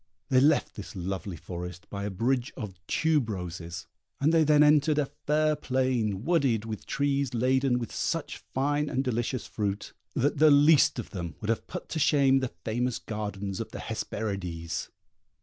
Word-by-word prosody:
They 130 Hz, -, +5 dB
left 145 Hz, +3 st, +3 dB
this 105 Hz, -, -9 dB
lovely 95 Hz, 0 st, -4 dB
forest 90 Hz, +1 st, -7 dB
by 100 Hz, 0 st, -4 dB
a -, -, -1 dB
bridge 120 Hz, +5 st, 0 dB
of 95 Hz, -4 st, -6 dB
tube 155 Hz, -7 st, +2 dB
roses, 90 Hz, -3 st, -5 dB, 0.3 s
and 150 Hz, +4 st, +3 dB
they 165 Hz, -1 st, +5 dB
then 150 Hz, 0 st, +5 dB
entered 150 Hz, 0 st, +4 dB
a 150 Hz, -, +3 dB
fair 155 Hz, +2 st, 0 dB
plain, 130 Hz, -8 st, 0 dB
wooded 135 Hz, -11 st, +2 dB
with 110 Hz, -2 st, -6 dB
trees 140 Hz, -2 st, 0 dB
laden 130 Hz, +1 st, +2 dB
with 120 Hz, -3 st, -5 dB
such -, -, -2 dB
fine 145 Hz, +2 st, -1 dB
and 130 Hz, -, 0 dB
delicious 120 Hz, 0 st, -1 dB
fruit, 100 Hz, -2 st, -3 dB, 0.2 s
that 145 Hz, +2 st, +1 dB
the 155 Hz, 0 st, +7 dB
least 145 Hz, 0 st, +6 dB
of 120 Hz, -, -5 dB
them 85 Hz, -5 st, -5 dB
would 105 Hz, -, -5 dB
have 115 Hz, -, -3 dB
put -, -, -6 dB
to 160 Hz, -, -2 dB
shame 140 Hz, -3 st, +4 dB
the 130 Hz, -2 st, -3 dB
famous 120 Hz, +2 st, 0 dB
gardens 100 Hz, -3 st, -4 dB
of -, -, -4 dB
the -, -, -8 dB
Hesperides. 90 Hz, -6 st, -4 dB
125 Hz, 170 wpm, -28 LUFS, 100-140 Hz, 0.3 s, the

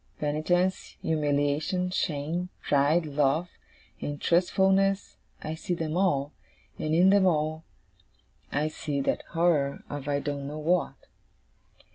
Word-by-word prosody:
Penitence, 175 Hz, +5 st, 0 dB
humiliation, 150 Hz, +4 st, 0 dB
shame, 165 Hz, +1 st, -2 dB
pride, 150 Hz, +4 st, +3 dB
love, 150 Hz, +3 st, +1 dB, 0.5 s
and 145 Hz, 0 st, -4 dB
trustfulness 190 Hz, +3 st, +2 dB, 0.3 s
I 155 Hz, -, -3 dB
see 175 Hz, +2 st, -3 dB
them 160 Hz, -1 st, -3 dB
all; 150 Hz, -6 st, +1 dB, 0.5 s
and 155 Hz, +1 st, 0 dB
in 185 Hz, +3 st, +6 dB
them 200 Hz, -1 st, +5 dB
all, 155 Hz, -1 st, 0 dB, 0.9 s
I 150 Hz, +2 st, 0 dB
see 150 Hz, -2 st, -3 dB
that 135 Hz, -, 0 dB
horror 165 Hz, -5 st, +1 dB
of 145 Hz, -1 st, -5 dB
I 145 Hz, -1 st, +1 dB
don't 140 Hz, -1 st, -4 dB
know 150 Hz, +2 st, -6 dB
what. 170 Hz, +3 st, +1 dB
155 Hz, 120 wpm, -28 LUFS, 145-180 Hz, 0.9 s, in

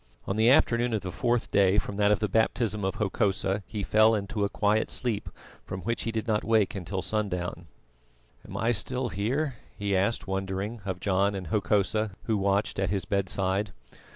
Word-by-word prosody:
On 95 Hz, -, -2 dB
the 110 Hz, +2 st, +4 dB
afternoon 120 Hz, -2 st, +3 dB
of 105 Hz, -, -1 dB
the 95 Hz, -, -4 dB
fourth 120 Hz, +2 st, 0 dB
day 100 Hz, 0 st, +4 dB
from 100 Hz, -1 st, -1 dB
that 105 Hz, 0 st, +4 dB
of 105 Hz, -, +4 dB
the 105 Hz, -, 0 dB
baptism 110 Hz, 0 st, +1 dB
of 95 Hz, -, -1 dB
Hokosa 100 Hz, -1 st, 0 dB
he 105 Hz, -2 st, -4 dB
fell 110 Hz, +2 st, +5 dB
into 100 Hz, +1 st, -2 dB
a 100 Hz, -, +1 dB
quiet 105 Hz, +2 st, +1 dB
sleep, 120 Hz, -5 st, -2 dB, 0.3 s
from 95 Hz, -, -6 dB
which 115 Hz, +3 st, -2 dB
he 115 Hz, -, -1 dB
did 110 Hz, 0 st, -3 dB
not 105 Hz, -1 st, +1 dB
wake 110 Hz, -3 st, +2 dB
till 95 Hz, 0 st, -3 dB
sundown. 90 Hz, -5 st, -3 dB, 0.8 s
"Am -, -, -8 dB
I 115 Hz, +3 st, +2 dB
still 125 Hz, +4 st, 0 dB
here?" 125 Hz, -, -1 dB, 0.2 s
he 100 Hz, -1 st, 0 dB
asked 100 Hz, +5 st, +1 dB
wondering, 95 Hz, +3 st, -3 dB
of 95 Hz, -2 st, -3 dB
John 100 Hz, +1 st, +1 dB
and 95 Hz, -4 st, -5 dB
Hokosa 105 Hz, 0 st, +1 dB
who 110 Hz, -, 0 dB
watched 100 Hz, +1 st, 0 dB
at 95 Hz, -1 st, +1 dB
his 95 Hz, -1 st, -1 dB
bedside. 100 Hz, +1 st, -1 dB
105 Hz, 185 wpm, -28 LUFS, 95-110 Hz, 0.8 s, fell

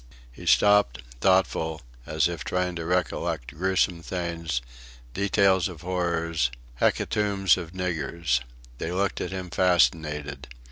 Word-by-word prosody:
He -, -, -11 dB
stopped, 100 Hz, -13 st, +4 dB, 0.2 s
thoughtful, 80 Hz, -4 st, +2 dB, 0.2 s
as 80 Hz, 0 st, +2 dB
if 85 Hz, -5 st, -5 dB
trying 90 Hz, -1 st, -1 dB
to 85 Hz, -, -4 dB
recollect 90 Hz, -7 st, -1 dB
gruesome 90 Hz, 0 st, +1 dB
things, 85 Hz, -5 st, -3 dB, 0.5 s
details 100 Hz, -, +3 dB
of 85 Hz, -5 st, -9 dB
horrors, 85 Hz, -5 st, 0 dB, 0.3 s
hecatombs 100 Hz, -4 st, +2 dB
of 85 Hz, -2 st, -7 dB
niggers. 85 Hz, -6 st, -1 dB, 0.4 s
They 80 Hz, -, -3 dB
looked 95 Hz, +1 st, -1 dB
at -, -, -2 dB
him 95 Hz, -1 st, -6 dB
fascinated. 80 Hz, -5 st, +1 dB
85 Hz, 120 wpm, -26 LUFS, 80-95 Hz, 0.5 s, stopped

